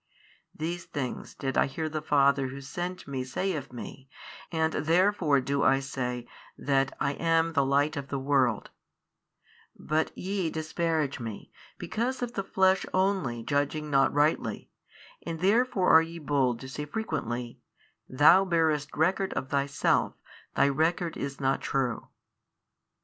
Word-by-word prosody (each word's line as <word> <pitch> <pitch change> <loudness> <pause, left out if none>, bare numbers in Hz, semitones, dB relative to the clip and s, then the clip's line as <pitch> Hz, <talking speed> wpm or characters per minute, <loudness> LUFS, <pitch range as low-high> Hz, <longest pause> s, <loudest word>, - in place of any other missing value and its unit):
These 170 +2 -4
things 130 -4 -5
did 135 -1 -1
I - - +3
hear 155 +4 -3
the 155 0 -3
Father 140 -2 +3
Who 135 +1 -7
sent 175 +7 -5
Me 135 -2 -3
say 185 +9 -2
of 140 -5 -5
Me, 130 +2 -9 0.4
and 160 -1 0
therefore 165 -1 +2
do 140 +2 -1
I 135 - +4
say 125 -3 -4 0.3
that 135 -1 0
I 140 - +1
am 165 +1 +1
the 140 -3 +3
Light 140 +3 +2
of 140 -2 -5
the 140 - -3
world, 130 -5 +1 1.1
but 155 +1 -1
YE 190 -2 -2
disparaged 160 -2 -1
Me, 115 -4 -7 0.3
because 250 +3 -2
of 240 -1 -4
the 195 - -2
Flesh 190 0 +2
only 185 -12 0
judging 145 +3 -1
not 135 -1 +4
rightly, 150 +2 0 0.5
and 165 -1 -5
therefore 200 +1 +3
are 160 - +9
ye 165 +1 -6
bold 135 -6 0
to 130 - -7
say 145 +3 -5
frequently, 120 - -4 0.5
THOU 150 +8 +6
bearest 160 -5 0
record 185 +4 +1
of 130 - -4
Thyself, 140 -1 +1 0.4
Thy 140 - +4
record 160 +4 0
is 140 0 -5
not 135 -1 +1
true. 130 -4 -1
145 Hz, 145 wpm, -28 LUFS, 135-170 Hz, 1.1 s, are